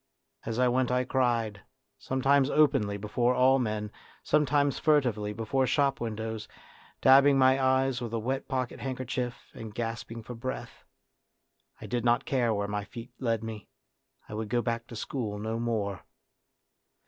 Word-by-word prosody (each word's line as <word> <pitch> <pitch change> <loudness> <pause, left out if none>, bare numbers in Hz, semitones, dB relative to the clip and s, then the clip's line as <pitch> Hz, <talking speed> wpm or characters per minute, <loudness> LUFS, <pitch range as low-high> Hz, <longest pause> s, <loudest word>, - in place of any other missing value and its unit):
As 115 0 -2
I 125 0 +4
went 125 0 +1
I 125 0 +2
cried, 120 -5 0 0.4
sometimes 135 +1 +2
openly 105 -10 +3
before 120 +5 0
all 130 +1 +5
men, 105 -3 -2 0.3
sometimes 145 -2 +2
furtively 125 -10 +2
before 115 +5 0
shop 140 -2 +1
windows, 110 -1 -4 0.5
dabbing 135 +1 +7
my 130 0 +4
eyes 130 -1 +2
with 120 -2 -4
a 115 - -1
wet 130 +4 -2
pocket 130 -2 -2
handkerchief, 130 -1 -4
and 110 -2 -9
gasping 115 0 -4
for 125 - -7
breath. 130 +2 -6 0.9
I - - -9
did 120 -1 -2
not 120 0 +2
care 125 -4 +1
where 100 -1 -1
my 105 0 -2
feet 115 +3 -10
led 115 -3 0
me, 110 -2 -7 0.6
I - - -9
would 110 0 -4
go 120 +1 +1
back 115 0 -2
to 115 - -9
school 110 -2 -4
no 110 +2 -3
more. 105 -6 -2
120 Hz, 155 wpm, -29 LUFS, 110-130 Hz, 0.9 s, dabbing